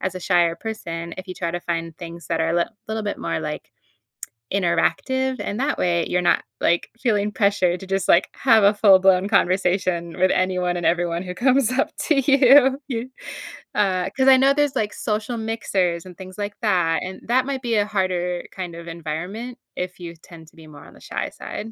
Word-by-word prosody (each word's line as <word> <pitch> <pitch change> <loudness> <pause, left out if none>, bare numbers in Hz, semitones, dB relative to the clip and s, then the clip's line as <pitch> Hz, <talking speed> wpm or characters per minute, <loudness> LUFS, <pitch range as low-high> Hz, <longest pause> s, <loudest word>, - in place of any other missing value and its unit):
as 185 -1 -2
a 185 - -6
shyer 175 -2 +2
person, 170 -6 -6
if 185 - -7
you 185 - -5
try 170 -2 -3
to 175 - -3
find 165 -1 -4
things 170 -1 -9
that 165 -1 0
are 165 +1 +1
lit 170 0 +2
a - - -26 0.2
little 220 0 -2
bit 205 - -3
more, 85 -1 -2
like, - - -6 0.8
interactive, 260 +8 0
and 210 - -4
that 290 +2 0
way, 170 -2 +1
you're 180 - +1
not, 175 - +2 0.2
like, 170 0 +1
feeling 210 -3 +1
pressured 200 -4 +1
to 190 - -10
just, 195 0 -1
like, 175 - +5
have 225 -5 +4
a 200 +1 +6
full 200 -2 +6
blown 190 0 +3
conversation 180 -3 +1
with 185 - +4
anyone 180 -1 0
and 175 - -4
everyone 175 0 0
who 180 - -6
comes 255 +4 +2
up 270 +5 +1
to 310 - +1
you 270 0 +6
you. 245 0 -3 0.6
Uh, 190 -3 +1
'cause 265 0 +2
I 265 - +9
know 270 +1 +4
there's, 290 -1 +1
like, 210 -1 0
social 220 +2 -3
mixers 195 -6 -1
and 180 -2 -12
things 185 0 -11
like 205 0 -4
that, 175 -7 +1
and 185 +1 -7
that 255 +1 +3
might 275 -2 -3
be 235 -3 -1
a 205 -1 +2
harder, 180 -4 -1
kind 180 -3 -6
of 170 0 -10
environment 180 +10 -6 0.2
if 180 0 -5
you 170 -1 -7
tend 165 -1 -15
to - - -28
be 160 - -14
more 145 -2 -13
on - - -15
the - - -18
shy - - -4
side. 225 +1 -7
185 Hz, 210 wpm, -22 LUFS, 170-220 Hz, 0.8 s, I